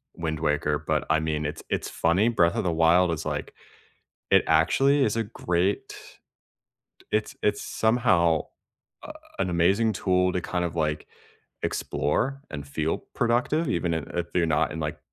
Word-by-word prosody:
Wind 80 -2 -3
Waker, 75 -1 0
but, - - 0
I 80 - +3
mean, 75 -1 -2
it's 75 - -5
it's - - -2
funny 90 +7 +2
Breath 85 -7 +2
of - - 0
the 85 - +1
Wild 85 +2 +4
is, 80 - -4
like - - -4 0.8
it - - +6
actually 140 +1 +3
is 110 -2 0
a 115 - +1
great 95 -2 -1 1.2
it's 105 0 -1
it's 105 0 +1
somehow, 85 -9 +2 0.6
uh, - - -8 0.3
an 95 - 0
amazing 95 +6 +2
tool 90 -2 +1
to 90 - -1
kind 90 0 -2
of, 85 - -3
like, 75 -1 -1 0.6
explore 135 - -1
and 70 -2 -6
feel 80 +3 -1 0.2
productive 125 +7 +1
even 85 -6 0
i - - 0 0.2
if 85 - -3
you're 90 -2 +3
not 75 -2 +1
in, 80 - -5
like, 75 -1 -4
85 Hz, 165 wpm, -26 LUFS, 80-105 Hz, 1.2 s, it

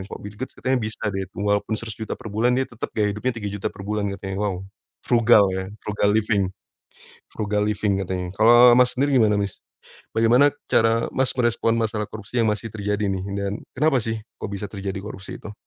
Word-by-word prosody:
Kalau - - -8
Bill 105 0 -9
Gates 130 - -6
katanya 130 0 0
bisa 110 0 -5
deh 95 -1 -3
walaupun 105 +2 0
Rp100.000.000 110 -1 -5
per 110 - -8
bulan 115 +4 +2
dia 130 +1 +1
tetap 115 -1 -5
gaya 105 -1 +1
hidupnya 120 +3 -2
Rp3.000.000 100 -1 -4
per - - -10
bulan 105 -1 -1
katanya. 95 -1 -6
Wow! 95 -3 -1 0.5
Frugal 120 -3 +5
ya, 95 0 -2 0.2
frugal 105 -1 +1
living, 105 -3 +1 0.8
frugal 105 -1 -1
living 105 -1 0
katanya. 90 -1 -3
Kalau 120 +2 +8
Mas 125 0 +4
sendiri 140 +1 +2
gimana 105 -2 +4
Mas? 100 -2 -3 0.6
Bagaimana 120 +6 +5 0.2
cara 115 +1 +3
Mas 130 -1 +2
merespon 120 -2 +1
masalah 105 -2 -1
korupsi 110 +3 -3
yang 110 - +2
masih 105 +2 -3
terjadi 105 0 -1
nih 95 -1 -1 0.2
dan 100 0 -2 0.3
kenapa 150 -2 +3
sih 115 0 -2 0.2
kok - - -3
bisa 100 0 -4
terjadi 100 -1 -5
korupsi 95 -1 -8
itu? 105 - -9
105 Hz, 190 wpm, -23 LUFS, 100-115 Hz, 0.8 s, Kalau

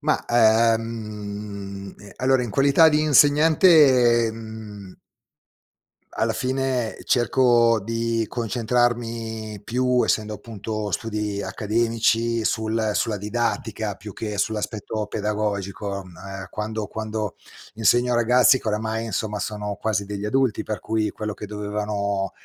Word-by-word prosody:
Ma, 150 0 0
ehm, 105 -4 0 0.2
allora, 130 0 +2
in 120 - -4
qualità 140 +7 +5
di 150 -1 +2
insegnante, 145 - +5
mhmm 110 -4 -10 1.2
alla - - +1
fine, 130 -3 -1
cerco 120 -2 +3
di 115 +2 -1
concentrarmi 115 -2 -1
più, 125 +1 +1
essendo, 110 0 0
appunto, 105 -2 -5
studi 105 -1 -2
accademici, 115 +3 0
sul 110 0 0
sulla 110 -1 0
didattica, 110 -1 -2
più 105 +1 -9
che 105 0 -5
sull'aspetto 110 0 -2
pedagogico. 100 -2 -3
Ehm, 90 -2 -15 0.4
quando 110 0 -4
quando 110 -1 -4 0.4
insegno 120 +3 +3
a - - +2
ragazzi 125 +2 +4
che, - - -4
oramai, 110 +2 -2
insomma, 105 0 -3
sono 105 -1 -4
quasi 105 -3 0
degli 100 0 -5
adulti, 130 +1 +1
per 110 -2 -4
cui 110 +2 -1
quello 105 -1 -5
che 105 - -8
dovevano, 105 -1 -2
110 Hz, 115 wpm, -23 LUFS, 105-120 Hz, 1.2 s, qualità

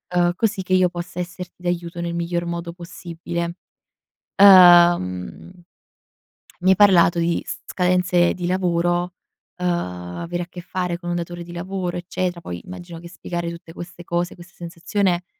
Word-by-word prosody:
uhm, 175 0 +3
così 210 -1 0
che 185 - -2
io 185 -1 +4
possa 175 0 -7
esserti 180 0 -7
d'aiuto 175 -1 -3
nel 170 0 -3
miglior 170 0 -2
modo 170 0 -4
possibile. 170 0 -6 0.8
Uhm, 175 - +6 1.1
mi 185 - +3
hai 190 - +6
parlato 175 -4 +5
di 170 0 0
s - - -5
scadenze 180 -1 +2
di 175 -1 -4
lavoro, 175 -1 0 0.4
uhm, 180 0 -2
avere 170 - -3
a - - -11
che 175 - -9
fare 180 -1 -3
con 175 0 -7
un 175 - -1
datore 175 0 -5
di 175 - -11
lavoro, 180 0 -4
eccetera; 175 0 -3
poi, 85 - -6
immagino 175 -2 -9
che 170 0 -11
spiegare 175 0 -5
tutte 170 -1 -11
queste 175 0 -9
cose, 175 +1 -2
questa 175 +1 -15
sensazione 175 +1 -1
175 Hz, 155 wpm, -22 LUFS, 170-180 Hz, 1.1 s, Uhm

